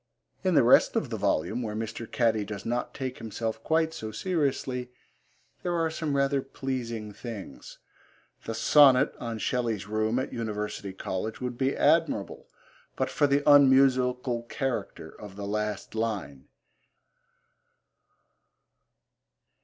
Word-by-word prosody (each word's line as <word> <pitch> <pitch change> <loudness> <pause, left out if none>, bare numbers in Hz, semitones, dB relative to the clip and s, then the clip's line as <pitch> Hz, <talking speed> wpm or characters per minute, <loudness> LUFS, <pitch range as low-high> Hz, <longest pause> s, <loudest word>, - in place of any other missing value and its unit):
In - - +2
the - - +6
rest - - +5
of - - -1
the - - -1
volume, 110 +10 0
where 105 -3 -4
Mr. 115 +1 -5
Catty 115 -3 +2
does 100 0 -7
not 120 +1 -2
take 130 -1 -5
himself 115 0 -4
quite 160 0 +1
so 110 -8 -6
seriously, 130 - -1 0.7
there 175 -1 -1
are 165 -1 0
some 155 -3 -2
rather 140 0 +2
pleasing 120 -5 -5
things. 110 -3 -9 0.7
The 115 - -4
sonnet 140 +1 +6
on 115 -2 -4
Shelley's 115 -3 -1
room 110 +2 0
at 130 - -2
University 105 -3 -4
College 95 +3 -4
would 125 -1 -4
be 135 +2 0
admirable 155 -9 +1 0.5
but - - -1
for 145 - +3
the 140 +1 +2
unmusical 130 -3 +5
character 135 -4 -3
of 105 -2 -10
the 100 0 -6
last 105 0 -3
line. 105 -12 -3
120 Hz, 130 wpm, -28 LUFS, 110-135 Hz, 0.7 s, the